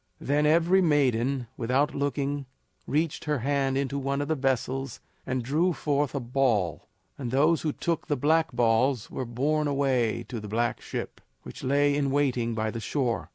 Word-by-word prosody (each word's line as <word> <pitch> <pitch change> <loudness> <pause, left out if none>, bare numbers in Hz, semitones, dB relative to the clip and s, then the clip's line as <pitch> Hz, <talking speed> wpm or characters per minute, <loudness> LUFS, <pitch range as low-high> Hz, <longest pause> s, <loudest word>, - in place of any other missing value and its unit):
Then 145 +2 +1
every 170 +4 +4
maiden, 135 -5 +2
without 130 +5 +1
looking, 140 -1 -2 0.4
reached 155 +3 -1
her 150 -1 0
hand 135 +1 0
into 140 0 -1
one 140 +1 -1
of 145 +1 -3
the - - +3
vessels 135 -1 -1 0.3
and 130 -1 -1
drew 160 +8 +1
forth 145 -2 -1
a - - 0
ball, 120 - 0 0.3
and 125 -4 -3
those 150 +6 +3
who 155 - 0
took 165 +2 -2
the 145 - 0
black 160 +4 +2
balls 120 +1 +1
were 130 - -3
borne 145 +6 0
away 135 -5 +1
to 120 - -4
the 105 - -8
black 115 +3 -1
ship, - - -6 0.2
which - - -10
lay 145 +2 +3
in 140 -1 +1
waiting 125 -5 0
by 110 0 -1
the 115 - -5
shore. 120 +1 -2
135 Hz, 175 wpm, -27 LUFS, 125-145 Hz, 0.4 s, every